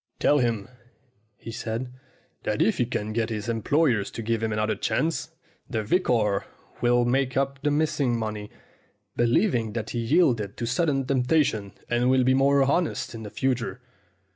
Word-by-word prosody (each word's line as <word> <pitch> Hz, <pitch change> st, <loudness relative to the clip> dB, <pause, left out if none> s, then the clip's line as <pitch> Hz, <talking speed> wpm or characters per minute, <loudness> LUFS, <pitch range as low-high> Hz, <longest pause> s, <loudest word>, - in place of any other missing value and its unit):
'Tell 145 Hz, -, +3 dB
him,' 115 Hz, -5 st, 0 dB, 0.7 s
he 115 Hz, -, -8 dB
says, 115 Hz, +2 st, -3 dB, 0.6 s
'that -, -, -2 dB
if -, -, +2 dB
he -, -, +2 dB
can 105 Hz, +1 st, -3 dB
get 115 Hz, 0 st, 0 dB
his 110 Hz, 0 st, -4 dB
employers 115 Hz, 0 st, +1 dB
to 115 Hz, -, -6 dB
give 115 Hz, 0 st, -1 dB
him 110 Hz, -1 st, -1 dB
another 110 Hz, 0 st, 0 dB
chance, 160 Hz, 0 st, -1 dB, 0.4 s
the 110 Hz, -2 st, -1 dB
vicar 110 Hz, -, +1 dB, 0.4 s
will 120 Hz, 0 st, +3 dB
make 130 Hz, +1 st, +1 dB
up 135 Hz, 0 st, -1 dB
the 150 Hz, -, +1 dB
missing 145 Hz, -5 st, +1 dB
money, 105 Hz, -2 st, -4 dB, 0.7 s
believing 120 Hz, -, +2 dB
that 110 Hz, -2 st, -4 dB
he 120 Hz, -, -2 dB
yielded 115 Hz, -, +2 dB
to 120 Hz, -, -2 dB
sudden 135 Hz, +2 st, +1 dB
temptation 125 Hz, -6 st, +1 dB
and 120 Hz, +1 st, +1 dB
will 130 Hz, 0 st, +4 dB
be 130 Hz, +1 st, +4 dB
more 135 Hz, +1 st, +4 dB
honest 150 Hz, +2 st, 0 dB
in 115 Hz, -, -7 dB
the 105 Hz, -, -7 dB
future.' 125 Hz, +1 st, -1 dB
120 Hz, 165 wpm, -26 LUFS, 110-135 Hz, 0.7 s, will